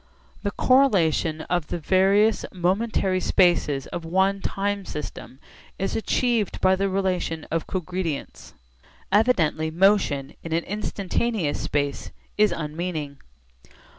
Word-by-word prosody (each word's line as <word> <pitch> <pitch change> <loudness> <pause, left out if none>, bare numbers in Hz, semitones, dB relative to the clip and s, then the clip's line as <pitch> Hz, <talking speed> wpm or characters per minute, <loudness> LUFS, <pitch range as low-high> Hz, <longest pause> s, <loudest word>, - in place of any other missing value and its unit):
The 200 - -1
correlation 185 - +2
of 175 -1 -2
the - - -3
various 195 +6 +3
momentary 190 +1 0
spaces 170 -8 +2
of 175 - -6
one 190 +4 +1
time 200 +1 -2
system 150 -5 -7 0.4
is 195 - -2
achieved 230 -1 0
by 190 0 +4
the 195 +1 0
relation 185 -4 -1
of 165 0 -1
cogredience. 180 -4 -4 0.6
Evidently 185 -8 +2
motion 165 -6 +2
in 165 - -5
an 165 +1 +1
instantaneous 205 -3 -2
space 145 -1 -2 0.3
is 210 -2 +4
unmeaning. 155 -2 -4
185 Hz, 110 wpm, -24 LUFS, 160-200 Hz, 0.6 s, by